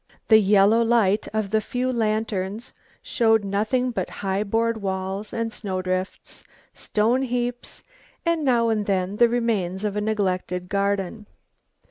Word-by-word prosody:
The 220 -1 +8
yellow 205 +2 +4
light 225 -3 +2
of 215 -2 -2
the 220 0 +2
few 250 +3 -2
lanterns 215 -1 -2 0.3
show 225 -1 +3
nothing 215 +5 -1
but 230 - -3 0.2
high 195 +1 0
board 225 +1 0
walls 190 +1 -3
and 230 -1 -3
snow 190 -4 -3
drifts, 185 +1 -4 0.3
stone 225 +5 0
heaps, 245 -1 -3 0.4
and 335 -2 +1
now 235 -4 +2
and 215 -2 -1
then 190 0 -1
the 235 +1 +5
remains 215 -6 -1
of 210 -1 -2
a 210 - -1
neglected 185 -4 -2
garden. 200 +1 -1
215 Hz, 140 wpm, -23 LUFS, 195-230 Hz, 0.4 s, The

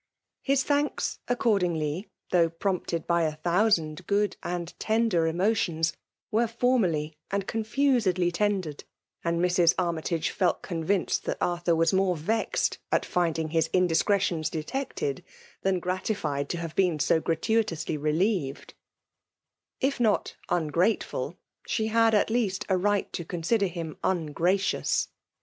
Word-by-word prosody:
His 275 -1 +2
thanks, 290 0 0
accordingly, 180 -8 0 0.2
though 170 -2 +4
prompted 170 -1 -2
by 170 0 +2
a 155 -2 0
thousand 170 -1 +1
good 205 0 +1
and 175 -1 -4
tender 220 -7 +2
emotions, 170 -2 +1 0.4
were 230 +2 +2
formally 185 -11 0
and 200 -1 -1
confusedly 220 -6 +1
tendered; 185 -5 -1 0.4
and 170 0 0
Mrs. 175 -1 +4
Army 170 -3 0
tagc 165 -1 -1
felt 185 -3 0
convinced 175 +2 -1
that - - -2
Arthur 175 -1 +1
was 165 +1 +2
moie 190 -1 +2
vexed 215 +9 0
at - - +2
finding 165 -3 0
his 160 0 +1
indiscretions 180 -2 +2
detected, 270 - -3 0.4
than 190 -1 +1
gratified 175 -6 -2
to 175 - -2
have 165 -2 -5
been 180 -5 +2
so 155 +2 +3
gratuitously 170 -2 0
relieved* 155 0 -1 1.1
If 275 0 0
not 220 -3 +1
ungrateful, 175 +5 0 0.3
she 220 - 0
had 225 0 +4
at 210 - +2
least 215 -6 0
a 190 - +3
right 205 +2 0
to 170 - -3
consider 180 +5 0
him 165 -3 -6
ungracious. 180 +2 +1
180 Hz, 125 wpm, -27 LUFS, 165-210 Hz, 1.1 s, though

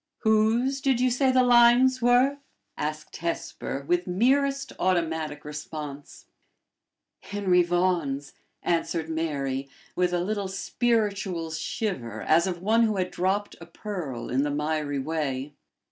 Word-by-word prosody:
'" - - -61
"Whose 225 +5 +2
did 265 -3 +2
you 255 0 +2
say 260 +2 +3
the 255 0 +4
lines 245 +1 +5
were?" 250 +4 +4 0.4
asked 155 0 -5
Hesper, 160 -4 -4
with 175 +1 +1
merest 275 +8 +1
automatic 160 -5 -1
response. 150 -1 -7 0.9
"Henry 195 -3 +1
Vaughan's," 175 -6 0 0.3
answered 165 -1 -1
Mary, 140 -4 -2 0.3
with 180 0 +1
a 175 - +1
little 200 +2 -2
spiritual 200 -5 -1
shiver 160 - -3
as 165 +3 +3
of 175 -1 -4
one 225 +3 +3
who 215 -3 +2
had 185 -1 -1
dropped 190 +3 -1
a 170 - -10
pearl 170 - -6
in 130 +2 +2
the 145 - 0
miry 150 0 -1
way. 140 -1 -3
180 Hz, 130 wpm, -26 LUFS, 155-220 Hz, 0.9 s, lines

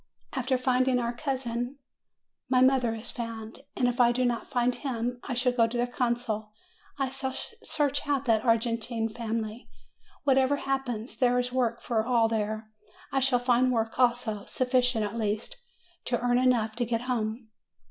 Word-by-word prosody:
After 260 0 +1
finding 255 0 +2
our 235 -1 -1
cousin, 255 -1 -3 0.7
my 255 - +4
mother 255 -3 +4
is 220 - -6
found; 230 -1 -6 0.2
and 245 - +3
if 245 +1 +1
I 240 -1 +6
do 250 +1 +1
not 240 -1 -1
find 250 -2 +2
him, 245 -1 -3
I 255 - -3
shall 250 +1 +2
go 235 -2 +3
to 235 +2 -4
the 240 - +2
consul: 235 -3 -2 0.4
I 270 -2 0
shall 265 0 -4 0.3
search 285 -1 0
out 280 -1 +1
that 225 -3 +3
Argentine 230 -1 +1
family. 225 0 -4 0.5
Whatever 270 0 +4
happens, 270 -5 -3
there 245 -1 +4
is 250 0 0
work 235 -2 0
for 225 -2 +1
all 235 -1 +3
there; 215 0 -2 0.4
I 270 - +2
shall 265 -1 +3
find 245 +1 +3
work 225 0 -1
also; 240 -4 +2
sufficient 250 -3 +1
at 215 +3 -4
least, 215 - -2 0.5
to 240 - 0
earn 245 0 +2
enough 235 -4 +2
to 240 - +1
get 230 0 -1
home.'' 230 -2 -2
245 Hz, 170 wpm, -28 LUFS, 230-255 Hz, 0.7 s, I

